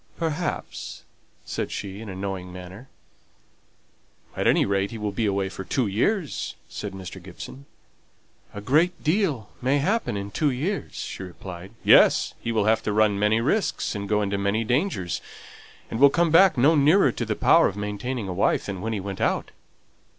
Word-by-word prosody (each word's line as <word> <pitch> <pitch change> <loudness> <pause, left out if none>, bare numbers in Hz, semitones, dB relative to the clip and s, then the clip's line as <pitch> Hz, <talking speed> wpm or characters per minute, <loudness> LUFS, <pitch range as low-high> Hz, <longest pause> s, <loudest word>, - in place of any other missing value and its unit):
"Perhaps," 165 +1 -4 0.4
said - - -3
she, 100 +1 -5
in 110 - -8
a 95 - -6
knowing 95 -1 -5
manner. 90 +8 -10 1.5
"At - - 0
any - - +4
rate 100 0 0
he 115 - -7
will 105 -1 -2
be 105 +2 -1
away 100 -1 0
for 95 0 -7
two 125 +6 0
years," 145 - -1
said 100 -2 -6
Mr. 95 -1 -8
Gibson. 95 +9 -10 0.8
"A 100 - -7
great 160 - +2
deal 155 - 0
may 130 +3 +2
happen 185 - 0
in 100 0 -5
two 150 +5 +1
years," 155 +11 -3
she - - -6
replied. 90 +1 -9
"Yes! - - +5
he 115 - -3
will 110 -3 +1
have 110 0 +3
to 105 - -2
run 105 -1 +3
many 105 +2 +3
risks, 190 - 0
and 100 -2 -5
go 105 0 +2
into 100 0 -1
many 100 +3 0
dangers, 120 - -1 0.7
and 110 - -3
will 140 +1 +8
come 170 +3 +2
back 185 -1 +6
no 140 +6 +5
nearer 150 +1 +5
to - - -4
the - - -2
power - - +5
of 100 - -5
maintaining 105 +3 -3
a 90 - -3
wife 95 - +1
than 95 -2 -5
when 110 +2 -2
he 105 - -2
went 95 0 -6
out." - - 0
105 Hz, 180 wpm, -25 LUFS, 100-140 Hz, 1.5 s, will